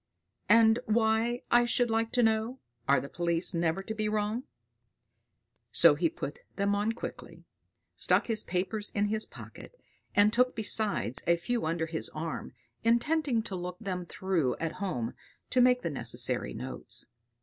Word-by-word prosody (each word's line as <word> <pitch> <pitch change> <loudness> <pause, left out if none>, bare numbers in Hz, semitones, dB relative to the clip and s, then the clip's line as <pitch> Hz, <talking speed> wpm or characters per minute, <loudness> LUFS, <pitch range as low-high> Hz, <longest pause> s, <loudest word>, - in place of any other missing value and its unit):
And 225 0 +6
why, 225 +2 +1
I 240 0 +6
should 240 0 +1
like 225 0 0
to 245 - +3
know, 220 +3 +1 0.3
are 140 - +5
the - - -6
police 170 +3 -1
never 170 +2 0
to 220 - -4
be 215 -1 -1
wrong? 215 +3 -1 1.3
So - - +7
he - - +1
put 480 - -6 0.2
them 200 0 +1
on 205 +3 0
quickly, 235 - -8 0.5
stuck - - +2
his 220 -2 +4
papers 190 +4 -2
in 205 0 +1
his 215 0 +1
pocket, - - -12 0.4
and 205 +1 +5
took 250 +1 +3
besides 205 - 0
a 170 - +5
few 230 +3 -2
under 165 0 -1
his 160 -1 -2
arm, 155 -5 -5 0.3
intending 235 +1 +2
to 200 -4 -5
look 180 0 -5
them 185 -4 -4
through 170 -11 0
at 165 -1 -2
home 125 - -2 0.4
to 255 - +4
make 250 0 +4
the 170 - -1
necessary 120 -4 -1
notes. - - -4
215 Hz, 160 wpm, -30 LUFS, 175-230 Hz, 1.3 s, So